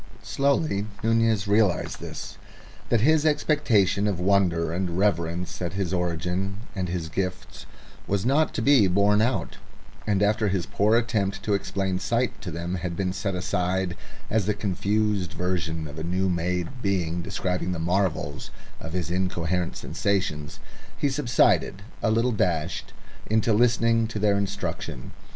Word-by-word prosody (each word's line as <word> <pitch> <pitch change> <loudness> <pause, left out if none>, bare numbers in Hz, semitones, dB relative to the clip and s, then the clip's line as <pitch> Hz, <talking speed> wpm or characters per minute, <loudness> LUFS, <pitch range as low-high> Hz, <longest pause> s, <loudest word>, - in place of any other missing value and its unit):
Slowly 140 -7 +1 0.2
Nunez 115 -2 +2
realised 100 -3 +2
this; - - -7 0.5
that 115 - +3
his 155 +4 +4
expectation 120 - +2
of 100 -4 -1
wonder 90 -4 +2
and 90 -1 -2
reverence 85 -3 0
at 85 0 -2
his 95 -2 -2
origin 90 +3 -2
and 90 -2 -3
his 85 -2 -3
gifts 95 +3 -4 0.4
was 100 +1 0
not 145 +5 +3
to 115 - -1
be 135 -7 +6
borne 100 +3 +3
out; 115 -6 -1 0.5
and 100 -1 +2
after 105 +1 +2
his 95 -3 0
poor 105 +3 +2
attempt 110 -4 0
to 105 - 0
explain 95 -2 -1
sight 120 +4 -1
to 90 - -5
them 85 +2 -4
had 90 -2 -3
been 90 0 -1
set 100 0 -2
aside 90 0 -1 0.3
as 105 -3 0
the 105 - +1
confused 105 0 0
version 85 -3 -2
of 75 +1 -8
a - - -4
new 90 +3 0
made 90 +7 -2
being 90 -5 0
describing 90 -2 -2
the 90 - -2
marvels 80 -4 -1 0.3
of 80 +1 -7
his 90 -3 -2
incoherent 90 -1 -1
sensations, 90 -7 -2 0.4
he 145 - +1
subsided, 120 -7 +2 0.2
a 110 - +2
little 115 +3 +2
dashed, 85 -5 -1 0.4
into 110 +1 +2
listening 115 0 +3
to 110 - -5
their 105 -1 +2
instruction. 100 -9 -4
95 Hz, 150 wpm, -25 LUFS, 90-110 Hz, 0.5 s, be